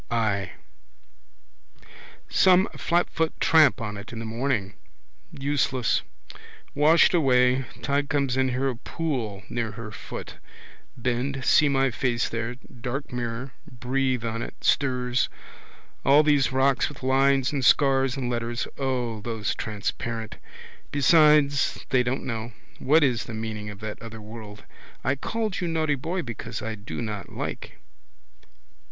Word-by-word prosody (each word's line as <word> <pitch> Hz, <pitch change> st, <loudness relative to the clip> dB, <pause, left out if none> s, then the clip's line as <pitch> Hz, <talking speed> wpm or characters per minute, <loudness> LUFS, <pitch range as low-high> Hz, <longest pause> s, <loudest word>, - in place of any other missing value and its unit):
I. 110 Hz, -4 st, 0 dB, 1.7 s
Some 185 Hz, 0 st, +5 dB
flatfoot 170 Hz, -2 st, 0 dB
tramp 155 Hz, -4 st, +5 dB
on 105 Hz, -3 st, -4 dB
it 100 Hz, +2 st, -9 dB
in 115 Hz, -, -7 dB
the 115 Hz, -, -5 dB
morning. 110 Hz, -3 st, -1 dB, 0.6 s
Useless. 140 Hz, -3 st, 0 dB, 0.7 s
Washed 155 Hz, +5 st, +5 dB
away. 130 Hz, -4 st, +3 dB, 0.2 s
Tide 140 Hz, +2 st, 0 dB
comes 140 Hz, -3 st, +1 dB
here. 130 Hz, 0 st, +2 dB
Saw 130 Hz, +2 st, -1 dB
a 135 Hz, -2 st, 0 dB
pool 120 Hz, -, -3 dB
near 115 Hz, -3 st, -3 dB
her 105 Hz, 0 st, -7 dB
foot. 95 Hz, -, -8 dB, 0.6 s
Bend, 130 Hz, +2 st, -2 dB
see 150 Hz, -, +5 dB
my 135 Hz, -1 st, +2 dB
face 120 Hz, +2 st, 0 dB
there, 115 Hz, +2 st, -3 dB
dark 125 Hz, +2 st, -6 dB
mirror, 120 Hz, +2 st, -4 dB, 0.2 s
breathe 125 Hz, 0 st, -1 dB
on 115 Hz, 0 st, -3 dB
it, -, -, -6 dB
stirs. 125 Hz, -2 st, +1 dB, 0.7 s
All 145 Hz, +3 st, +6 dB
these 145 Hz, -4 st, +3 dB
rocks 130 Hz, 0 st, +2 dB
with 145 Hz, -3 st, -12 dB
lines 135 Hz, 0 st, +3 dB
and 140 Hz, -3 st, -2 dB
scars 135 Hz, -1 st, +4 dB
and 130 Hz, -2 st, -2 dB
letters. 120 Hz, 0 st, -2 dB
O, 125 Hz, -5 st, -1 dB
those 110 Hz, -1 st, -2 dB
transparent! 110 Hz, +1 st, -4 dB, 0.5 s
Besides 145 Hz, 0 st, +4 dB
they 130 Hz, -2 st, +4 dB
don't 125 Hz, +2 st, -2 dB
know. 115 Hz, -1 st, -4 dB, 0.3 s
What 150 Hz, +3 st, +4 dB
is 125 Hz, -5 st, +1 dB
the 110 Hz, -, -7 dB
meaning 110 Hz, -1 st, -5 dB
of 105 Hz, 0 st, -10 dB
that 105 Hz, -1 st, -6 dB
other 115 Hz, -1 st, -8 dB
world. 105 Hz, -1 st, -10 dB, 0.4 s
I 130 Hz, -, +2 dB
called 215 Hz, -, -3 dB
you 175 Hz, -, -1 dB
naughty 160 Hz, -2 st, +1 dB
boy 165 Hz, +7 st, -3 dB
because 115 Hz, -1 st, -6 dB
I 110 Hz, -, -3 dB
do 110 Hz, +3 st, -6 dB
not 105 Hz, -2 st, -5 dB
like. -, -, -5 dB
125 Hz, 135 wpm, -25 LUFS, 115-140 Hz, 1.7 s, All